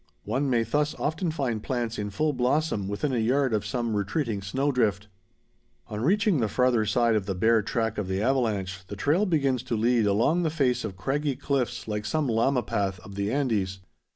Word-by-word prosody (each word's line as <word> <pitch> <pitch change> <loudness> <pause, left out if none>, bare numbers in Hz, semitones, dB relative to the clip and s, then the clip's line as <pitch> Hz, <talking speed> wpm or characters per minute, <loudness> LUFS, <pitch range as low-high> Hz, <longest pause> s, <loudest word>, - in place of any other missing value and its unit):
One 130 +6 -1
may 120 -3 +2
thus 150 +5 0
often 160 +4 -1
find 130 -8 -2
plants 120 -3 -2
in 105 0 -2
full 150 +9 0
blossom 125 -4 0
within 100 +8 -2
a 120 - +1
yard 130 +3 +2
of 105 - 0
some 120 -4 -1
retreating 105 +1 -1
snow 135 +9 0
drift. 105 -6 0 0.8
On 105 0 -4
reaching 195 - +2
the 110 - +1
farther 120 -1 +2
side 115 +2 +3
of 105 -3 0
the 95 - -1
bare 110 +4 +3
track 110 0 -1
of 100 - -3
the 95 0 -1
avalanche, 105 -7 0
the 100 - -6
trail 155 - +1
begins 140 -7 +1
to 115 - -2
lead 115 -1 +2
along 115 - +2
the 165 - +1
face 130 -6 +1
of 100 -4 -5
craggy 140 +6 -1
cliffs 125 -4 -2
like 105 -1 -3
some 155 +4 0
llama 120 +2 +2
path 95 -2 -2
of 100 - -11
the 100 +1 -2
Andes. 105 -9 0
120 Hz, 200 wpm, -26 LUFS, 105-140 Hz, 0.8 s, side